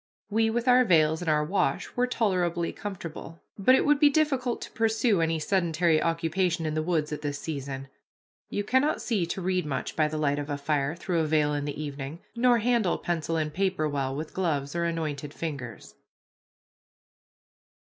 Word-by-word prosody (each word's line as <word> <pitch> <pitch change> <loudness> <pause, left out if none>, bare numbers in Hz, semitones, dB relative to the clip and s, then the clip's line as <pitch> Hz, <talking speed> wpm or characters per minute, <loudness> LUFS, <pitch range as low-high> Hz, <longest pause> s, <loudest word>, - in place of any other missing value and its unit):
We 225 +1 +3
with 235 +2 -1
our 250 0 +6
veils 160 -6 +3
and 175 - -2
our 150 -1 +3
wash 160 -5 -1
were 250 0 +2
tolerably 180 -8 0
comfortable, 170 -4 -7 0.2
but 235 +6 +5
it - - +2
would 295 -1 +4
be 295 - +7
difficult 275 -5 +1
to - - -9
pursue 220 -3 +2
any 165 0 +1
sedentary 170 -1 +2
occupation 165 +1 0
in 155 - -1
the 155 - 0
woods 155 -2 0
at 150 - -5
this 145 -1 -3
season; 135 -3 -5 0.6
you 205 - -2
cannot 260 +7 +2
see 200 -8 -1
to 190 - -4
read 185 0 +1
much 150 -3 -4
by 155 -1 +3
the 155 +1 -4
light 145 -1 +1
of 145 0 -5
a 145 - -2
fire 145 +1 -1
through 175 0 -1
a 160 - +1
veil 150 -1 +2
in 145 -1 -2
the 145 0 -5
evening, 145 0 -5 0.2
nor 240 0 +4
handle 230 -4 +1
pencil 165 -1 -2
and 155 -1 -2
paper 185 -3 0
well 135 -2 -2
with 155 +2 -5
gloves 150 -6 -1
or 170 0 0
anointed 155 -3 -3
fingers. 140 -8 -6
165 Hz, 185 wpm, -27 LUFS, 150-200 Hz, 0.6 s, be